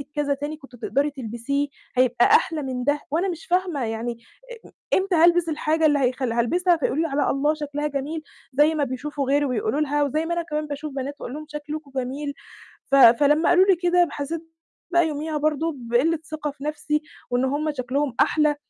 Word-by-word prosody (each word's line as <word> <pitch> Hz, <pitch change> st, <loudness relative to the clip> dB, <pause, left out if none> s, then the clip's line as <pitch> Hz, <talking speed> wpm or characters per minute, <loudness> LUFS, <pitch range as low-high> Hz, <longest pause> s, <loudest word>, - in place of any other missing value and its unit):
كذا 290 Hz, -1 st, +1 dB
تاني 290 Hz, +2 st, -5 dB
كنتِ 270 Hz, -4 st, -15 dB
تقدري 280 Hz, +5 st, 0 dB
تلبِسيه 265 Hz, +2 st, -2 dB, 0.3 s
هيبقى 250 Hz, -1 st, +4 dB
أحلى 320 Hz, -2 st, +3 dB
من 255 Hz, -2 st, -3 dB
ده 290 Hz, +3 st, +1 dB
وأنا 340 Hz, +6 st, +1 dB
مش 340 Hz, -2 st, -6 dB
فاهمة 355 Hz, -6 st, 0 dB
يعني 225 Hz, +1 st, -3 dB, 0.5 s
آآ، -, -, -12 dB
م -, -, -18 dB, 0.3 s
إمتى 380 Hz, -1 st, 0 dB
هالبِس 340 Hz, +1 st, +4 dB
الحاجة 315 Hz, +1 st, +1 dB
اللي 295 Hz, -2 st, +4 dB
هيخلّ 255 Hz, -1 st, 0 dB
هالبِسها 340 Hz, +10 st, +2 dB
فيقولوا 300 Hz, 0 st, 0 dB
لي -, -, 0 dB
عليها 290 Hz, -1 st, +1 dB
الله 290 Hz, +3 st, +1 dB
شكلها 295 Hz, -1 st, -3 dB
جميل، 295 Hz, +3 st, -4 dB, 0.3 s
زي 295 Hz, +4 st, +4 dB
ما 300 Hz, -, +1 dB
بيشوفوا 280 Hz, +2 st, -3 dB
غيري 290 Hz, +1 st, +3 dB
وبيقولوا 290 Hz, -, -1 dB
لها 295 Hz, 0 st, +1 dB
وزي 305 Hz, +3 st, 0 dB
ما 340 Hz, -, -1 dB
أنا 340 Hz, -, 0 dB
كمان 305 Hz, -2 st, -3 dB
باشوف 290 Hz, 0 st, -5 dB
بنات 275 Hz, +1 st, -4 dB
وأقول 245 Hz, -, -6 dB
لهم 305 Hz, 0 st, -7 dB
شكلكم 300 Hz, -1 st, -6 dB
جميل، 275 Hz, +3 st, -3 dB, 0.5 s
ف -, -, -1 dB
فلمّا 285 Hz, +5 st, +6 dB
قالوا 360 Hz, +2 st, +6 dB
لي 385 Hz, -2 st, +5 dB
كده 355 Hz, 0 st, +3 dB
ب 335 Hz, -, -7 dB
حسّيت 310 Hz, +3 st, -4 dB, 0.5 s
بقى 345 Hz, -2 st, +4 dB
يوميها 305 Hz, +1 st, -3 dB
برضه 310 Hz, +2 st, 0 dB
بقلِّة 250 Hz, +7 st, +1 dB
ثِقة 305 Hz, -1 st, -3 dB
في 280 Hz, 0 st, -11 dB
نَفْسي 300 Hz, 0 st, -1 dB, 0.3 s
وإن 245 Hz, +1 st, +1 dB
هُم 290 Hz, +3 st, 0 dB
شكلهم 260 Hz, +1 st, -1 dB
أحلى. 300 Hz, -1 st, +3 dB
295 Hz, 195 wpm, -24 LUFS, 270-315 Hz, 0.5 s, فلمّا